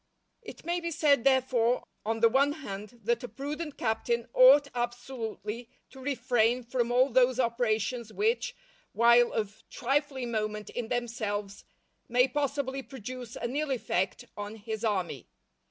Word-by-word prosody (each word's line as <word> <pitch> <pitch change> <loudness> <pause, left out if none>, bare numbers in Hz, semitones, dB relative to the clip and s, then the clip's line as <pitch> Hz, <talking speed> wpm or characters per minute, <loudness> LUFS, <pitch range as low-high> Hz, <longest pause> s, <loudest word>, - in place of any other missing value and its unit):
_" - - -47 0.4
It - - -11
may 345 +1 0
be 340 0 -3
said, 290 -6 +3
therefore, 255 -3 +3 0.2
on 225 +1 -2
the 230 - +8
one 275 +5 +3
hand, 230 -5 -8
that 235 +2 0
a - - -3
prudent 295 +4 -5
captain 230 +1 -1
ought 275 +3 +8
absolutely 240 -2 -4 0.2
to 265 - -13
refrain 250 -2 +1
from 240 0 -1
all 255 +2 +4
those 255 +1 +4
operations 235 -1 0
which, 445 - 0 0.4
while 235 +1 +5
of 210 -1 -3
trifling 270 -1 -1
moment 215 -1 -3
in 240 -2 -4
themselves, 215 -4 -3 0.4
may 250 +2 +4
possibly 275 0 -2
produce 255 -2 -8
an 240 +3 -4
ill 305 0 0
effect 195 -7 -1
on 205 +1 -6
his 220 0 -6
army. 185 - -1
245 Hz, 145 wpm, -29 LUFS, 225-265 Hz, 0.4 s, the